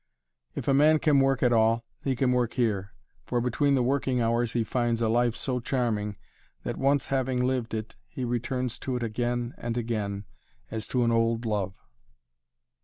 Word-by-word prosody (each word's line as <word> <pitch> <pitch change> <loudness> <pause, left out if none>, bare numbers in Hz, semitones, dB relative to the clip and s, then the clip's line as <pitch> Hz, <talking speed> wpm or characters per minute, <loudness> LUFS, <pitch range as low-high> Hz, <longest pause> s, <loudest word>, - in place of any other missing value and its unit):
If - - -5
a 135 - +4
man 150 +3 +6
can 150 -2 +3
work 135 -1 +2
at 120 -1 +4
all, 115 +1 +3 0.2
he 135 -2 0
can 125 0 +2
work 125 -2 +1
here, 100 -5 -1 0.3
for 120 - 0
between 130 +4 +2
the 130 - +2
working 130 0 +1
hours 115 0 +1
he 120 - +1
finds 120 0 0
a 115 - +1
life 120 +1 +2
so 125 -2 -2
charming, 115 -5 -1 0.5
that - - -3
once 140 -1 +2
having 130 -1 +1
lived 125 -3 -1
it 110 0 -5
he 130 - -4
returns 120 0 -2
to 130 - -3
it 125 - -2
again 120 +1 -2
and 120 0 -3
again, 105 -4 -2 0.5
as 110 -1 -4
to 125 -1 +1
an 115 - +2
old 115 0 +1
love. 100 -4 -1
120 Hz, 180 wpm, -27 LUFS, 115-130 Hz, 0.5 s, man